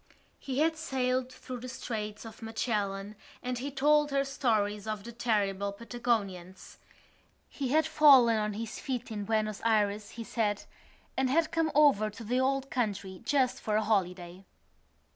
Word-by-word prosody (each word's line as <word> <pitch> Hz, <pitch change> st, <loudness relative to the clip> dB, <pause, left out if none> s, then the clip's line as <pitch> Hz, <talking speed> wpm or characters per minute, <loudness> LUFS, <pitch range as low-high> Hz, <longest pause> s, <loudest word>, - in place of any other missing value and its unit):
He 265 Hz, -1 st, -4 dB
had 320 Hz, +1 st, +3 dB
sailed 255 Hz, -4 st, -1 dB
through 255 Hz, -1 st, -8 dB
the 255 Hz, +2 st, -7 dB
Straits 215 Hz, -3 st, -5 dB
of 225 Hz, -1 st, -11 dB
Magellan 210 Hz, -3 st, -2 dB, 0.3 s
and 250 Hz, -1 st, -2 dB
he 275 Hz, +3 st, -3 dB
told 295 Hz, +2 st, +3 dB
her 275 Hz, 0 st, +1 dB
stories 215 Hz, -6 st, 0 dB
of 215 Hz, -2 st, -3 dB
the 235 Hz, -, -8 dB
terrible 200 Hz, -4 st, 0 dB
Patagonians. 200 Hz, -5 st, -3 dB, 0.7 s
He 275 Hz, -, -4 dB
had 310 Hz, +5 st, +3 dB
fallen 265 Hz, -6 st, +6 dB
on 210 Hz, -1 st, -1 dB
his 220 Hz, +1 st, -5 dB
feet 250 Hz, -3 st, -4 dB
in 205 Hz, -2 st, -4 dB
Buenos 215 Hz, -1 st, -1 dB
Ayres, 210 Hz, -2 st, +1 dB
he 230 Hz, -, -4 dB
said, 210 Hz, -2 st, -1 dB, 0.5 s
and 265 Hz, -1 st, +1 dB
had 320 Hz, +3 st, +2 dB
come 325 Hz, -1 st, +1 dB
over 280 Hz, -8 st, +5 dB
to 210 Hz, +2 st, -10 dB
the 245 Hz, +4 st, 0 dB
old 270 Hz, 0 st, 0 dB
country 200 Hz, -6 st, -2 dB
just 265 Hz, -3 st, +1 dB
for 215 Hz, -, -1 dB
a 215 Hz, -, +2 dB
holiday. 180 Hz, -3 st, -1 dB
230 Hz, 160 wpm, -30 LUFS, 210-260 Hz, 0.7 s, fallen